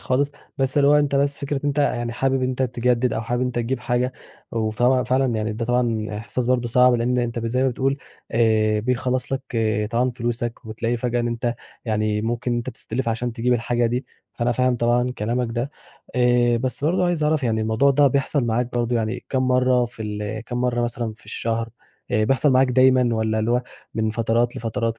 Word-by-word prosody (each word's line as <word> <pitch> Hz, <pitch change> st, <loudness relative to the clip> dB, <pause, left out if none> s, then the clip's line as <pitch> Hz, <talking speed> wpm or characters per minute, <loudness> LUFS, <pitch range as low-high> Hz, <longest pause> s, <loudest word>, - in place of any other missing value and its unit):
خالص، 130 Hz, +7 st, 0 dB, 0.3 s
بس 135 Hz, +1 st, 0 dB
اللي 140 Hz, -, +5 dB
هو 145 Hz, -, +6 dB
أنت 145 Hz, -1 st, +3 dB
بس 140 Hz, +1 st, +1 dB
فكرة 140 Hz, 0 st, -2 dB
إن -, -, -2 dB
أنت 145 Hz, 0 st, 0 dB
يعني 120 Hz, -4 st, 0 dB
حابب 135 Hz, +2 st, 0 dB
إن 125 Hz, -, +1 dB
أنت 130 Hz, 0 st, -1 dB
تجدِّد 125 Hz, -1 st, +1 dB
أو -, -, -1 dB
حابب 120 Hz, +2 st, -2 dB
إن 130 Hz, -, +1 dB
أنت 125 Hz, -, -4 dB
تجيب 120 Hz, +3 st, -1 dB
حاجة 125 Hz, +1 st, 0 dB, 0.4 s
وف 110 Hz, +1 st, -2 dB
وفعلًا 130 Hz, 0 st, +2 dB
يعني 110 Hz, 0 st, -1 dB
ده 115 Hz, +2 st, -3 dB
طبعًا 120 Hz, -3 st, 0 dB
إحساس 120 Hz, +2 st, -3 dB
برضه 125 Hz, -2 st, +1 dB
صعب 125 Hz, +1 st, +5 dB
لإن 120 Hz, +1 st, +1 dB
أنت 120 Hz, -1 st, -1 dB
ب 115 Hz, -, -3 dB
زي 125 Hz, +3 st, 0 dB
ما 135 Hz, -, +3 dB
بتقول 135 Hz, +2 st, 0 dB, 0.4 s
آآ 110 Hz, -2 st, +3 dB
بيخلّص 125 Hz, +2 st, -1 dB
لك 135 Hz, 0 st, -1 dB, 0.5 s
طبعًا 125 Hz, +2 st, +1 dB
فلوسك 120 Hz, -1 st, -3 dB
وبتلاقي 115 Hz, +2 st, -2 dB
فجأة 120 Hz, 0 st, -1 dB
إن 120 Hz, -, -1 dB
أنت 120 Hz, 0 st, -2 dB, 0.3 s
يعني 110 Hz, -1 st, 0 dB
ممكن 120 Hz, +2 st, -1 dB
أنت 120 Hz, +2 st, -3 dB
تستلف 115 Hz, +1 st, -4 dB
عشان 120 Hz, +1 st, -2 dB
تجيب 125 Hz, +1 st, 0 dB
الحاجة 120 Hz, 0 st, +1 dB
دي، 125 Hz, +3 st, -2 dB, 0.3 s
فأنا 120 Hz, +1 st, 0 dB
فاهم 125 Hz, 0 st, +1 dB
طبعًا 120 Hz, +1 st, +2 dB
كلامك 120 Hz, +3 st, -1 dB
ده. 120 Hz, +4 st, -2 dB, 0.4 s
آآ 120 Hz, -1 st, +3 dB
بس 130 Hz, +4 st, -3 dB
برضه 180 Hz, +3 st, +2 dB
عايز 175 Hz, -3 st, 0 dB
أعرف 150 Hz, -1 st, +1 dB
يعني 110 Hz, -2 st, +1 dB
الموضوع 110 Hz, +6 st, +3 dB
ده 140 Hz, +1 st, +4 dB
بيحصل 140 Hz, 0 st, +1 dB
معاك 120 Hz, +1 st, -1 dB
برضه 120 Hz, 0 st, 0 dB
يعني 115 Hz, +2 st, -2 dB
كام 130 Hz, -1 st, 0 dB
مرّة 125 Hz, -1 st, +3 dB
في 115 Hz, -2 st, -8 dB
ال 105 Hz, +1 st, -4 dB
كام 120 Hz, 0 st, -3 dB
مرة 125 Hz, -1 st, +1 dB
مثلًا 120 Hz, -1 st, -2 dB
في -, -, -16 dB
الشهر، 115 Hz, 0 st, -2 dB, 0.4 s
آآ 110 Hz, +1 st, +2 dB
بيحصل 135 Hz, +5 st, +3 dB
معاك 130 Hz, 0 st, +4 dB
دايمًا 130 Hz, -1 st, +4 dB
والّا 110 Hz, 0 st, 0 dB
اللي 110 Hz, +2 st, 0 dB
هو 125 Hz, +1 st, +2 dB, 0.3 s
من 110 Hz, -1 st, 0 dB
فترات 115 Hz, +2 st, 0 dB
لفترات 115 Hz, 0 st, -2 dB
120 Hz, 210 wpm, -22 LUFS, 115-130 Hz, 0.5 s, هو